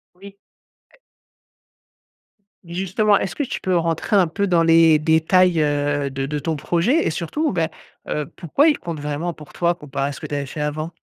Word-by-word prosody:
Oui 200 +1 -14 0.6
et - - -23 1.7
justement, 190 +4 +1
est-ce 190 - -4
que 290 - -1
tu - - -5
peux 185 -1 0
rentrer 165 +4 -1
un 185 -4 +5
peu 200 +5 -2
dans 170 -2 +3
les 165 -1 +6
détails, 160 +3 +3
heu, 145 -1 0
de 135 0 -3
de 150 +1 -3
ton 160 +1 -2
projet 180 - +1
et - - +1
surtout, 295 - -2
ben, 165 -3 0 0.4
heu, 150 -1 -2
pourquoi 230 - +2
il 300 - +2
compte 165 -3 -6
vraiment 150 +4 -3
pour 150 -1 -14
toi 170 0 +1
comparé 140 -3 -4
à - - -4
ce 140 - -9
que - - -8
tu - - -7
avais 140 -1 -2
fait 150 +1 -6
avant? 155 +2 -3
165 Hz, 195 wpm, -21 LUFS, 150-185 Hz, 1.7 s, les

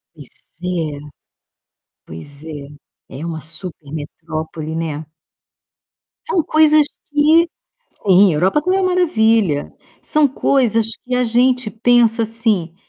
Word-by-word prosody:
Pois 145 -5 -13 0.3
é, 165 -5 -3 1.1
pois 140 - -11
é. 145 -3 -8 0.4
É 140 +5 -7
uma 160 -2 -5
super 160 -1 -9
metrópole, 155 +1 -6
né. 160 -2 -3 1.2
São 370 -8 +1
coisas 310 -1 +4 0.3
que 320 +3 +4 0.4
sim, 190 -2 +3
Europa 190 - +1
também 370 +4 +1
é - - +1
maravilha. 225 - +1 0.3
São 305 -1 +2
coisas 245 -4 +1 0.2
que 250 0 -1
a 250 - +2
gente 245 0 +2
pensa, 230 0 +3
assim, 215 -7 -1
215 Hz, 110 wpm, -18 LUFS, 160-255 Hz, 1.2 s, coisas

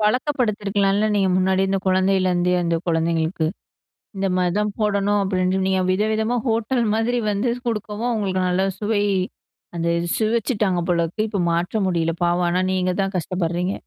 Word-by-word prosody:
பழக்கப்படுத்தியிருக்கலால, 210 -4 +1
நீங்க 195 -2 +2
முன்னாடி, 190 +1 +2
அந்த 195 0 +1
குழந்தையிலருந்தே, 185 -1 +2
அந்த 170 -1 0
குழந்தைங்களுக்கு. 165 0 0 0.7
இந்த 195 0 -1
மாதிதான் 200 +4 0
போடணும், 205 -1 +1
அப்படின்னு. 185 -1 0
நீங்க 190 -1 +1
வித 195 +3 +1
விதமா, 220 +3 0
ஹோட்டல் 230 +2 +1
மாதிரி 225 +3 0
வந்து 210 +5 0 0.2
குடுக்கவும், 215 +1 -2
அவங்களுக்கு 195 -5 -1
நல்ல 185 +2 +1
சுவை, 210 -1 0 0.7
அந்த 170 - -1 0.3
சுவைச்சுட்டாங்க 215 -4 0
போலருக்கு. 175 +5 0
இப்ப 200 -4 -1
மாற்ற 170 +5 -1
முடியல, 165 -2 0
பாவம். 175 +1 +2
ஆனா 180 +1 +1
நீங்க 185 -1 0
தான் 195 0 -2
கஷ்டப்பட்றீங்க. 180 +1 -2
195 Hz, 140 wpm, -22 LUFS, 180-215 Hz, 0.7 s, நீங்க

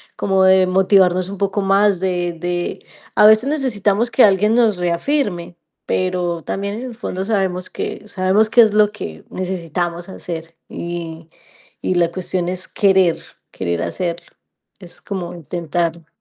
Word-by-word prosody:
como 190 -1 +1
de 190 0 +5
motivarnos 185 -1 +3
un 200 - -6
poco 200 +1 0
más, 195 0 +3
de 175 -2 -1
de 175 +1 -3 0.3
a 210 - +6
veces 220 +5 +6
necesitamos 235 -6 0
que 255 - +5
alguien 210 +2 +4
nos 230 -5 +3
reafirme, 175 - -1 0.3
pero 180 -2 -1
también 200 +1 -3
en 225 - -6
el 240 - -9
fondo 190 -4 -4
sabemos 190 -4 -1
que 210 - -5
sabemos 195 +3 +2
qué 240 - +7
es 220 -2 +4
lo 210 -1 +4
que 80 - -8
necesitamos 175 -1 -3
hacer 165 -3 -7
y 170 -1 -6 0.5
y 185 - -1
la 170 -1 +2
cuestión 180 0 -3
es 185 0 -4
querer 190 -4 +3 0.3
querer 85 -2 -3
hacerlo. 170 - -3 0.5
Es 180 -3 -12
como 185 -4 -5
intentarlo. 170 0 -3
185 Hz, 150 wpm, -19 LUFS, 175-200 Hz, 0.5 s, qué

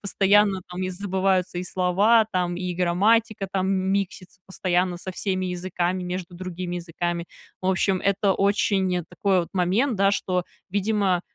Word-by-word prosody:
постоянно, 200 -1 +3
там, 180 +1 -5
забываются 185 -1 0
и - - -2
слова, 195 +6 +3
там, 180 -2 0
и 180 0 -3
грамматика, 200 +4 +2
там, 190 0 0
миксится 190 -1 -2
постоянно 180 -1 0
со 185 +1 -7
всеми 185 0 -2
языками, 180 0 -2
между 180 0 -5
другими 180 0 -5
языками. 170 0 -3 0.3
В 185 - -4
общем, 190 0 +1
это 200 0 +2
очень, 195 -2 +1
э, 175 - -3
такой 195 -3 +1
вот 170 - -5
момент, 195 +8 +1
да, 195 +1 +4
что, 180 -3 -1 0.3
видимо, 200 -2 +1
185 Hz, 150 wpm, -24 LUFS, 180-195 Hz, 0.3 s, да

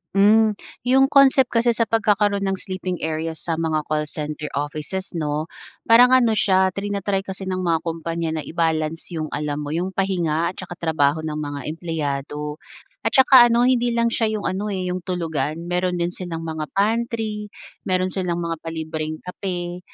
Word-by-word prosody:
Hmm. 215 +2 +5 0.3
'Yong 265 +2 +4
concept 270 -2 +5
kasi 235 +1 +4
sa 230 -1 0
pagkakaroon 210 -2 +2
ng 195 -1 -1
sleeping 185 -2 -4
areas 160 0 -3
sa 165 - +1
mga 160 -1 0
call 150 0 0
center 150 0 -5
offices, 155 +7 -4
'no, 155 -1 -2 0.4
parang 245 +2 +7
ano 240 -4 +5
siya, 190 -2 +3
trina-try 200 -1 -1
kasi 190 0 -6
ng 185 0 -2
mga 165 -2 +2
kumpanya 165 0 -3
na 155 - -3
i-balance 160 0 -1
'yong 155 -1 -3
alam 150 0 -3
mo 145 - -5
'yong 180 +4 -2
pahinga 170 -4 0
at - - -14
saka 180 -1 -7
trabaho 160 -2 +1
ng 155 -1 -3
mga 145 -1 -4
empleyado. 150 -2 -4 0.5
At - - -1
saka 260 -2 +8
ano, 235 +1 +3
hindi 245 -1 +2
lang 235 0 +2
siya 220 -2 0
'yong 210 - -4
ano, 195 +3 -3
eh, 185 -3 -2
'yong 180 - -2
tulugan 165 -3 -3
meron 180 +1 -1
din 175 0 -1
silang 175 -3 -6
mga 160 -2 -4
pantry, 215 0 0 0.4
meron 185 0 +1
silang 175 -3 -2
mga 165 -1 -3
palibreng 160 -1 -4
kape, 180 -1 -4
180 Hz, 170 wpm, -22 LUFS, 160-205 Hz, 0.5 s, saka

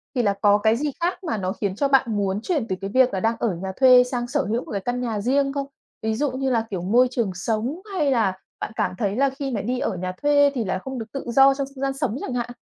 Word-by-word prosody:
thì 245 - +2
là 200 -2 +2
có 205 0 +5
cái 220 +2 +2
gì 295 +1 -1
khác 355 +3 -1
mà 310 -11 -2
nó 185 -1 -2
khiến 200 -4 -3
cho 280 +6 +1
bạn 270 -3 +4
muốn 195 0 -1
chuyển 280 -4 -1
từ 185 - -1
cái 195 - -4
việc 260 -2 +4
là 190 - 0
đang 225 +4 +1
ở 210 -7 0
nhà 190 +2 -5
thuê 255 -2 +8
sang 245 -1 -3
sở 285 +2 0
hữu 230 +4 -2
một - - -10
cái 200 -2 -2
căn 245 +4 -2
nhà 225 -4 -2
riêng 275 +4 +1
không? 280 -1 -3 0.3
Ví 220 0 -1
dụ 285 +1 0
như 265 +1 -2
là, 225 -2 +1
kiểu, 185 -4 -3
môi 235 +8 +4
trường 230 -6 -1
sống, 230 - -2
hay 300 -6 +1
là 220 -7 +2 0.3
bạn - - -4
cảm - - 0
thấy 205 -1 -1
là 275 +2 +3
khi 270 0 -5
mà 215 -5 -2
đi 250 +4 -2
ở 190 - -2
nhà 185 +1 -3
thuê 285 -1 +4
thì 235 - 0
là 185 0 -1
không 265 +4 -6
được 225 - -5
tự 275 - -4
do 270 +2 +6
trong 275 0 -3
không 265 - -9
gian 270 0 0
sống 270 -4 -2
chẳng 255 - -4
hạn? 245 -1 -2
245 Hz, 295 wpm, -23 LUFS, 210-270 Hz, 0.3 s, thuê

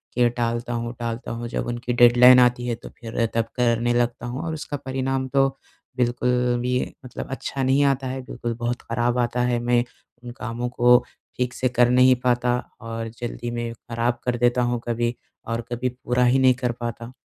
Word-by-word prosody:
कि 120 -1 +4
टालता 120 0 -2
हूँ, 120 0 -3
टालता 115 0 -4
हूँ 120 0 -4
जब - - -3
उनकी 120 0 -3
डेडलाइन 125 +1 +7
आती 125 0 +3
है 120 - 0
तो 115 - -11
फिर 115 -1 -1
तब 115 -1 +1
करने 120 0 +2
लगता 120 0 0
हूँ 125 +3 -4
और 160 - -3
उसका 150 -1 -5
परिणाम 130 -1 -2
तो 135 0 +3 0.5
बिल्कुल 125 0 +1 0.3
भी 125 +1 0 0.3
मतलब 125 - -7
अच्छा 135 0 -3
नहीं 135 +2 +3
आता 135 -1 +1
है 130 +1 -4
बिल्कुल 120 -2 -5
बहुत 120 +1 -2
खराब 120 +1 -1
आता 120 0 0
है 120 -1 +1
मैं 120 0 +2 0.4
उन 120 - -7
कामों 120 0 -4
को 125 0 +5 0.3
ठीक 125 -1 -1
से 130 - 0
कर 120 0 +3
नहीं 125 +1 +6
पाता 125 0 +2 0.2
और 115 0 -5
जल्दी 120 0 -4
मैं 120 -1 -3
खराब 120 +1 -2
कर 120 -1 0
देता 120 +1 +2
हूँ 120 - -1
कभी 120 0 0 0.3
और 115 +1 -2
कभी 125 +1 -1
पूरा 125 0 -1
ही 130 +2 +4
नहीं 130 -1 +5
कर 125 -1 -1
पाता। 120 +1 -5
120 Hz, 195 wpm, -23 LUFS, 120-125 Hz, 0.5 s, डेडलाइन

